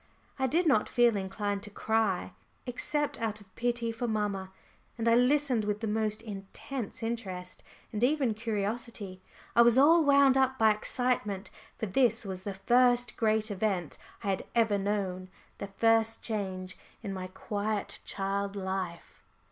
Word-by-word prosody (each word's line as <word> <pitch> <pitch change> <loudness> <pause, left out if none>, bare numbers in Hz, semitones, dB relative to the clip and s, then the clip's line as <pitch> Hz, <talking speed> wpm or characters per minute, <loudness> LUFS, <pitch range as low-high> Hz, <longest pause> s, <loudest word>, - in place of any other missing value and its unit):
I 265 - +2
did 335 +7 +2
not 245 -9 +3
feel 240 -2 +4
inclined 200 +1 -2
to 210 - -9
cry, 220 -2 0 0.3
except 290 +3 -2
out 215 -2 -2
of 195 -2 -20
pity 240 -1 -1
for 230 +2 -3
mamma. 205 -4 -2 0.5
And 230 0 -1
I 230 - +6
listened 250 -1 +3
with 210 0 -1
the - - -1
most 215 0 -1
intense 210 +3 -6
interest, 190 -6 -4 0.3
and 215 +2 -2
even 265 -3 +2
curiosity. 215 -2 -3 0.3
I 235 - +7
was 235 +1 +6
all 320 +5 +7
wound 280 -2 +5
up 265 0 +2
by 220 -2 +5
excitement, 215 -2 -1 0.3
for - - -2
this 225 +1 +2
was 190 -2 -5
the 195 0 -5
first 245 +4 +3
great 220 -1 +1
event 195 -5 -1 0.2
I 200 - -1
had 190 - 0
ever 220 -3 +3
known, 195 -2 -2 0.3
the 200 - -4
first 225 +3 +2
change 190 -4 -3 0.2
in 200 -3 -4
my 185 -1 -5
quiet 205 +2 -3
child 200 0 -2
life. 190 -3 -4
215 Hz, 155 wpm, -30 LUFS, 195-240 Hz, 0.5 s, I